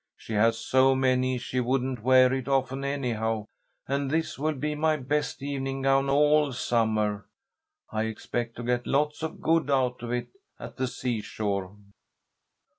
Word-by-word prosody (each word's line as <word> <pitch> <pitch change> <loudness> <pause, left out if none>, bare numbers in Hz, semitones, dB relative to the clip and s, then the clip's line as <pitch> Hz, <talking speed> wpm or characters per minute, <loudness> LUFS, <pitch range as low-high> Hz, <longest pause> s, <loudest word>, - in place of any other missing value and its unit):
She 115 - -8
has 115 +2 +3
so 130 +3 +3
many 130 -1 +2
she 125 +1 -3
wouldn't 130 -1 -1
wear 130 +1 +5
it 130 -1 -3
often 135 0 0
anyhow, 115 -6 -1 0.4
and 140 0 -1
this 160 -1 -1
will 155 +1 0
be 150 +3 -2
my 155 +1 +1
best 145 +1 -2
evening 135 -1 -3
gown 135 0 +3
all 150 0 +4
summer. 110 -4 0 0.6
I 110 0 -1
expect 115 +1 -4
to 120 - -6
get 120 0 -1
lots 150 +2 0
of 160 - -5
good 165 -3 +2
out 130 -3 +1
of 120 0 -5
it 120 0 -2 0.3
at - - -9
the 130 - 0
seashore." 105 -5 -3
130 Hz, 155 wpm, -27 LUFS, 120-140 Hz, 0.6 s, wear